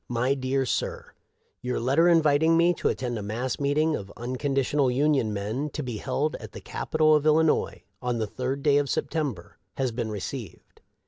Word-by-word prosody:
" - - -49
My 130 +3 +2
Dear 135 0 -1
Sir: - - -3 0.2
" - - -45 0.2
Your 125 0 -2
letter 140 +8 +3
inviting 160 0 +4
me 170 +1 +4
to - - -1
attend 120 -3 -2
i - - -5
mass 115 +5 -3
meeting 150 +3 +1
of 100 -1 -7
Unconditional 135 +2 0
Union 135 -3 +2
men, 110 +9 -3
to 150 - -3
be 120 -4 -4
held 140 +6 -1
at - - -11
the - - -7
Cap - - -7
itol 155 -1 +5
of 150 0 +1
Illinois, 155 +1 +2 0.2
on 125 -1 -1
the 110 - 0
3d 130 +5 -4
day 145 -2 +4
of 140 -1 -2
September, 140 - -3 0.2
has 130 -2 0
been 115 -1 -3
received. 105 - -7
135 Hz, 195 wpm, -26 LUFS, 120-150 Hz, 0.2 s, itol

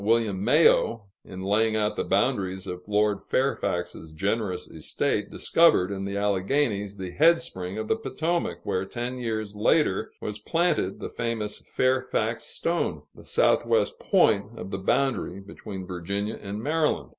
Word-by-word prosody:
William 110 -3 +1
Mayo, 115 -6 +4 0.2
in 95 0 -8
laying 110 +3 +2
out 105 0 +1
the - - -1
boundaries 95 -1 0
of 90 +1 -7
Lord 105 -1 +2
Fairfax's 90 - -1
generous 100 +2 -2
estate, - - -2
discovered 130 - +3
in 95 -1 -3
the 100 0 -3
Alleghanies 100 +1 0
the 95 -2 -5
head 165 - +5
spring 95 - -6
of 110 0 -3
the - - +2
Potomac, 175 -6 -2
where 95 - -1
ten 120 +5 -4
years 110 -3 -3
later 105 - +2
was 105 0 -5
planted 165 - 0
the - - -5
famous 110 -3 -3
"Fairfax 130 -3 0
Stone," 170 +1 -1
the - - -15
southwest 470 +1 +2
point 115 - +2
of 95 - -7
the 95 - -3
boundary 100 -2 0
between 100 -1 -8
Virginia 100 +4 -3
and 100 +2 -5
Maryland. 155 +1 0
105 Hz, 145 wpm, -26 LUFS, 95-130 Hz, 0.2 s, head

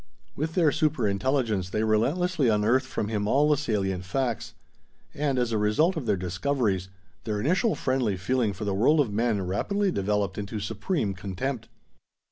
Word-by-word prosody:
With 160 +3 -3
their 165 -5 +4
super 155 -7 +1
intelligence, 105 -2 0
they 105 +3 -1
relentlessly 140 +8 +1
unearthed 115 +5 +2
from 110 - -3
him 105 -2 -1
all 145 +6 +3
the 150 - +4
salient 100 -10 -1
facts. 120 +3 -2 0.6
And, 140 -2 -1
as 120 -2 +1
a 110 - +1
result 105 - +2
of 145 -8 -4
their 105 -2 +2
discoveries, 95 +1 -1 0.3
their 105 -1 -2
initial 185 - +1
friendly 125 -7 0
feeling 115 +3 0
for 100 +3 -6
the 100 - 0
world 130 +11 +3
of 120 -8 +1
men 110 -3 0
rapidly 195 - 0
developed 100 - -1
into 105 +1 -4
supreme 105 - -2
contempt. 100 +7 -4
110 Hz, 165 wpm, -26 LUFS, 100-140 Hz, 0.6 s, their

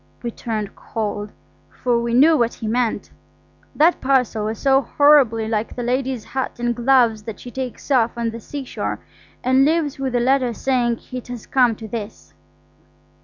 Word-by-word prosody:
We 235 - -3
turned 215 -3 -4
cold, 210 -2 -4 0.4
for 240 -2 0
we 235 0 -1
knew 310 +6 +6
what 235 -5 +1
he 225 - -7
meant. 235 0 -1 0.6
That 325 +4 +3
parcel 250 -5 +1
was 220 +1 -3
so 270 -1 +3
horribly 265 -5 +4
like 220 0 -2
the 245 - -4
lady's 255 -1 -1
hat 265 0 -4
and 240 0 0
gloves 240 -3 +3
that 215 -2 -8
she 245 - -9
takes 260 +2 -6
off 235 -3 +2
on 230 -1 -1
the 230 - -7
seashore 270 +3 -5 0.4
and 260 +1 +4
leaves 300 -2 +1
with 265 -2 -2
a - - +3
letter 255 -1 +2
saying 240 -2 0
it 255 -1 -6
has 245 -3 -7
come 245 -4 +3
to 220 +1 -9
this. 215 -1 -7
245 Hz, 170 wpm, -21 LUFS, 225-265 Hz, 0.6 s, knew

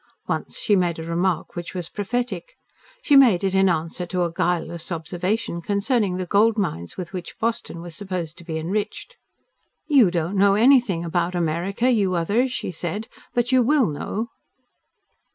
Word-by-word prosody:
Once - - -3
she 205 - +2
made 175 -3 +1
a 160 - -5
remark 170 +1 -1
which 175 +1 -6
was 175 -2 -4
prophetic. 210 -2 -3 0.5
She 290 - +4
made 235 -10 +6
it 190 -1 +1
in 190 0 +4
answer 170 +1 -2
to 180 0 0
a 170 - -1
guileless 170 0 -2
observation 175 +3 -2
concerning 200 0 0
the 185 - -2
gold 215 +5 +3
mines 85 - -3
with 180 0 -6
which 180 -2 -7
Boston 230 -6 -2
was 170 -2 -9
supposed 180 -4 -4
to - - -12
be 160 -2 -4
enriched. 205 - -3 0.7
"You 270 - +5
don't 175 +2 -1
know 200 0 +5
anything 225 -7 +4
about 175 +1 -1
America, 175 +8 0
you 200 -6 +2
others," 210 +10 +1
she 245 - -3
said. 180 +6 -4 0.3
"But 240 +1 +1
you 260 -1 +5
WILL 260 - +3
know!" 215 +10 -4
185 Hz, 170 wpm, -23 LUFS, 170-220 Hz, 0.7 s, made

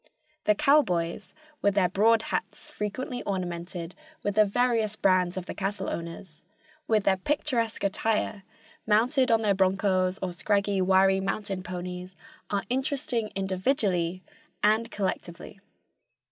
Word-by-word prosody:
The 210 - +4
cowboys, 200 - +2 0.3
with 200 -1 +2
their 190 -3 +4
broad 220 +4 +3
hats - - -4
frequently 245 +4 -4
ornamented 175 -2 -4 0.3
with 205 - 0
the 215 +1 +5
various 225 -1 +1
brands 185 -3 +2
of 185 - -4
the - - -5
cattle 195 0 -3
owners, 165 -1 -7 0.4
with 215 -2 +2
their 190 -1 +3
picturesque 235 -1 -1
attire, 210 +1 0 0.5
mounted 250 +5 +3
on 225 -1 +3
their 205 -2 +3
bronchos, 190 -1 +2
or 180 -1 -2
scraggy, 200 +1 +1
wiry 190 +1 +4
mountain 195 -1 -3
ponies, 180 0 -6 0.3
are 200 -1 -1
interesting 255 -3 -1
individually 185 -2 0 0.4
and 220 +2 +3
collectively. 190 -1 -4
195 Hz, 125 wpm, -27 LUFS, 185-220 Hz, 0.5 s, the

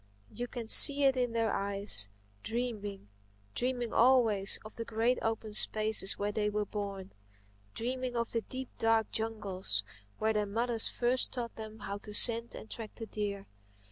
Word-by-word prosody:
You 245 0 -5
can 235 -1 -7
see 285 +5 +8
it 270 -1 +4
in 245 -2 -1
their 225 -1 0
eyes, 195 - -1 0.3
dreaming—dreaming 205 - -5
always 225 -5 +3
of 215 - -11
the 230 - -5
great 230 +3 -1
open 225 -1 -3
spaces 215 -2 +4
where 205 +1 -2
they 210 0 -1
were 210 0 -2
born; 200 -2 -7 0.6
dreaming 250 +1 -4
of 235 -1 -2
the 230 - -1
deep, 260 +2 -8
dark 225 -1 +1
jungles 195 - -2 0.3
where 220 0 0
their 210 -1 -1
mothers 230 +2 +2
first 250 +1 +2
taught 240 -3 -5
them 220 0 -10
how 200 +1 -6
to 210 0 -8
scent 230 +1 +3
and - - -10
track 220 -1 -7
the 225 - -7
deer. 200 -2 -5
220 Hz, 160 wpm, -31 LUFS, 205-235 Hz, 0.6 s, see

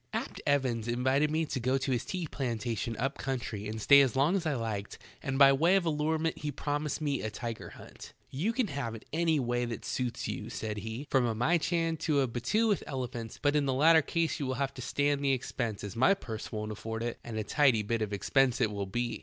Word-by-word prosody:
'T. - - -4
EVANS 130 -5 +1
invited 130 +5 +2
me 160 +1 0
to 140 - -3
go 130 +2 +1
to 135 0 -2
his 120 -3 0
tea 180 -3 -3
plantation 115 -5 -3
up 135 +3 -2
eountry 115 -6 -3
and 110 +1 -4
stay 140 +6 +7
as 135 -3 +2
long 145 +8 +3
as 175 -4 -1
I 150 - 0
liked 110 -4 -4 0.2
and 135 0 -2
by 135 0 +8
way 165 +7 +4
of 190 -3 +2
allurement 160 +1 0
he 150 0 -3
promised 145 +2 -2
me 145 -3 0
a 110 - -2
tiger 115 +1 -6
hunt. - - -12 0.2
"You 170 +12 0
ean 255 - +3
have 120 -5 -3
it 110 - -11
in 160 - -2
any 165 -3 +3
way 120 -1 0
that 120 -1 -6
suits 125 -2 -2
you," - - -4
said 105 -1 -4
he, 110 +6 -5
" - - -42
from 130 -3 +3
a 115 - -1
myehan 165 +5 +1
to 145 -3 +2
a 135 - +1
battue 170 - 0
with 205 -3 +1
elephants, 125 -5 -5
but 145 0 +2
in 145 -2 +2
the 130 - +1
latter 160 +3 +6
ease 165 -1 +1
you 140 - -2
will 130 - -1
have 135 0 -1
to 130 - -8
stand 145 +2 0
the 135 -1 +3
expense, 115 -4 -3
as 100 -2 -6
my 130 +11 +4
purse 110 - -7
won't 105 -1 -4
afford 115 +2 -5
it, 120 0 -3
and 115 -2 -6
a 110 - -1
tidy 130 -4 +3
bit 115 +2 -1
of 105 -1 -2
expense 125 +5 +2
it 115 -4 +2
will 100 -1 -3
be. 120 +4 -2
130 Hz, 245 wpm, -30 LUFS, 115-150 Hz, 0.2 s, by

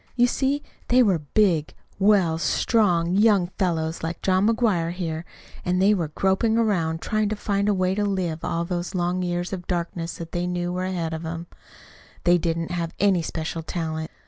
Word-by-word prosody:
You 245 -1 +5
see, 275 +3 0 0.2
they 250 +1 +5
were 190 -7 +2
big, 155 -1 +1 0.2
well, 190 -5 +3
strong, 175 -4 +2
young 200 -3 +4
fellows, 165 -4 0
like 165 +1 -4
John 190 +2 +3
McGuire 215 -8 +1
here; 170 -2 -4 0.4
and 180 +1 0
they 200 +3 +5
were 175 -6 0
groping 190 +8 +1
around, 170 -8 +1
trying 215 -1 0
to 215 - -1
find 200 0 0
a - - +3
way 185 0 +1
to 210 +1 0
live 185 -5 -2
all 170 0 -1
those 175 +2 -3
long 180 +1 0
years 175 +1 -2
of 180 -2 -6
darkness 170 -1 -3
that 165 -1 -8
they 175 0 -1
knew 175 0 -2
were 185 +1 -2
ahead 170 -3 -2
of 160 - -4
them. 165 +1 -5 0.8
They 175 0 +4
didn't 165 -1 -2
have 170 -1 -3
any 195 -2 +4
especial 160 0 -4
talent. 160 -1 -4
175 Hz, 185 wpm, -24 LUFS, 165-200 Hz, 0.8 s, You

